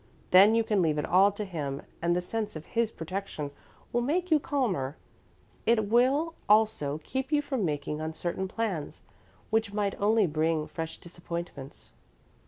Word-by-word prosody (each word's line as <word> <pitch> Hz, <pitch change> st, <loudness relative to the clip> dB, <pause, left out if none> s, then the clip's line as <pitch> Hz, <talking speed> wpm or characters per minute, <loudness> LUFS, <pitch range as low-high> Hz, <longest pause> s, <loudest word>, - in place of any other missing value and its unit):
Then 200 Hz, +4 st, +8 dB
you 230 Hz, -, +3 dB
can 210 Hz, -3 st, +1 dB
leave 155 Hz, -3 st, +2 dB
it 150 Hz, -, 0 dB
all 195 Hz, +3 st, +5 dB
to 210 Hz, +1 st, -4 dB
Him, 145 Hz, -7 st, -4 dB, 0.2 s
and 170 Hz, +1 st, +2 dB
the 180 Hz, -, 0 dB
sense 215 Hz, +1 st, -3 dB
of 155 Hz, -, -7 dB
His 230 Hz, -1 st, 0 dB
protection 160 Hz, -5 st, -5 dB, 0.4 s
will 240 Hz, -, +2 dB
make 345 Hz, +8 st, 0 dB
you 310 Hz, -, +6 dB
calmer. 195 Hz, -, -1 dB, 0.7 s
It 220 Hz, -3 st, +3 dB
will 270 Hz, +8 st, +3 dB, 0.2 s
also 210 Hz, -9 st, +3 dB
keep 265 Hz, +2 st, -3 dB
you 295 Hz, -1 st, +3 dB
from 265 Hz, -6 st, -2 dB
making 150 Hz, 0 st, -2 dB
uncertain 170 Hz, +4 st, -3 dB
plans, 195 Hz, -7 st, -3 dB, 0.5 s
which 220 Hz, -2 st, +1 dB
might 205 Hz, -1 st, 0 dB
only 215 Hz, +1 st, +4 dB
bring 155 Hz, -1 st, 0 dB
fresh 160 Hz, +1 st, -6 dB
disappointments." 170 Hz, -5 st, -8 dB
195 Hz, 160 wpm, -29 LUFS, 160-230 Hz, 0.7 s, Then